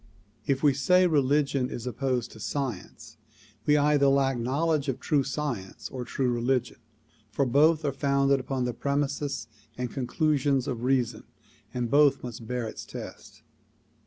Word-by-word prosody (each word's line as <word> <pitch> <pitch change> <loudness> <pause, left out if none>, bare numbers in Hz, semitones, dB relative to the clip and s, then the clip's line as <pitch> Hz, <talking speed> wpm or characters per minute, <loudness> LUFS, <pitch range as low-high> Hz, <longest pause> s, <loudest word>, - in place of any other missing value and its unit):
If 135 0 0
we 145 -2 +5
say 180 +7 +4
religion 140 -4 +2
is 120 - -6
opposed 125 -1 -2
to 110 - -13
science 125 -4 -5 0.5
we 150 0 +5
either 145 -1 +3
lack 135 -1 +3
knowledge 140 +5 0
of 130 -1 -2
true 145 +2 +1
science 135 -9 -4
or 125 -1 -5
true 130 0 -1
religion, 120 +1 0 0.5
for 135 +7 0
both 150 +5 +3
are 140 - +1
founded 140 0 +2
upon 130 -1 -2
the 125 - -2
premises 140 -2 -2 0.3
and 125 -1 -3
conclusions 140 0 0
of 120 -4 -3
reason 125 -1 0 0.5
and 120 -2 -3
both 145 -1 +4
must 115 -2 -7
bear 125 -1 -2
its - - -7
test. - - -10
135 Hz, 150 wpm, -27 LUFS, 125-145 Hz, 0.5 s, we